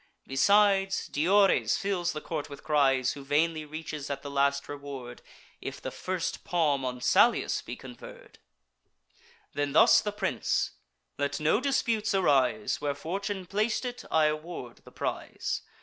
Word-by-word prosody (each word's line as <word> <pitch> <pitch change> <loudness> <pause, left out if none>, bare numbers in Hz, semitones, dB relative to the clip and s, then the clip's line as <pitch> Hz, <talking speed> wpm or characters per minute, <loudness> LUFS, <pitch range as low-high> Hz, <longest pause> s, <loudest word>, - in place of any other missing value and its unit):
Besides, 195 +6 +3
Diores 195 +6 +3
fills 185 -3 -1
the 155 - -5
court 155 -3 -4
with 140 0 -10
cries, 135 -4 +3
Who 140 - -9
vainly 155 +3 +1
reaches 150 -1 -6
at 140 -1 -4
the 140 - -6
last 140 0 +1
reward, 140 -4 -8 0.4
If - - -6
the - - -5
first 185 -2 -3
palm 150 -6 +1
on 125 -1 -4
Salius 210 - +3
be - - -7
conferr'd. - - -12 1.1
Then 145 -1 -1
thus - - +7
the 210 - -2
prince: 210 - -1 0.5
"Let 140 0 -1
no 155 +7 +3
disputes 230 -7 0
arise: 175 +3 +2
Where 145 -1 -1
fortune 190 +5 -4
plac'd 215 +6 -1
it, 245 0 -5
I 160 -1 +3
award 155 -5 -4
the - - -14
prize. - - -3
155 Hz, 145 wpm, -28 LUFS, 140-195 Hz, 1.1 s, thus